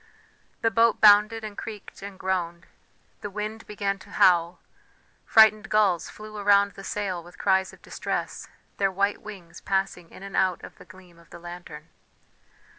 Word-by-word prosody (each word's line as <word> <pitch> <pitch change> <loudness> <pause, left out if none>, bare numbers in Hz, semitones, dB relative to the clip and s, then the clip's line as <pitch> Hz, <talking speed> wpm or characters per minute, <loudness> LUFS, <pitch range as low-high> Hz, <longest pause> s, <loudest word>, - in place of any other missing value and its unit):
The 225 - +3
boat 230 0 +3
bounded 215 +2 +6
and 210 -1 -7
creaked 210 -3 -9
and 200 -1 -9
groaned; 175 -3 -3 0.6
the 205 - -5
wind 215 +2 -6
began 200 -1 -3
to 200 - -16
howl, 175 -3 +3 0.7
frightened 220 -1 +5
gulls 200 -5 +2
flew 215 0 -10
around 200 0 +4
the 195 - -12
sail 195 -4 -3
with 175 +1 -16
cries 190 -1 +1
of - - -19
distress, - - -4 0.3
their 195 -1 +1
white 200 +2 0
wings 195 -6 -11
passing 190 -3 -2
in - - -13
and 195 0 -8
out 185 -2 +1
of - - -12
the - - -14
gleam 180 -2 -17
of 170 - -21
the - - -11
lantern. 170 -3 -10
195 Hz, 165 wpm, -25 LUFS, 180-210 Hz, 0.7 s, bounded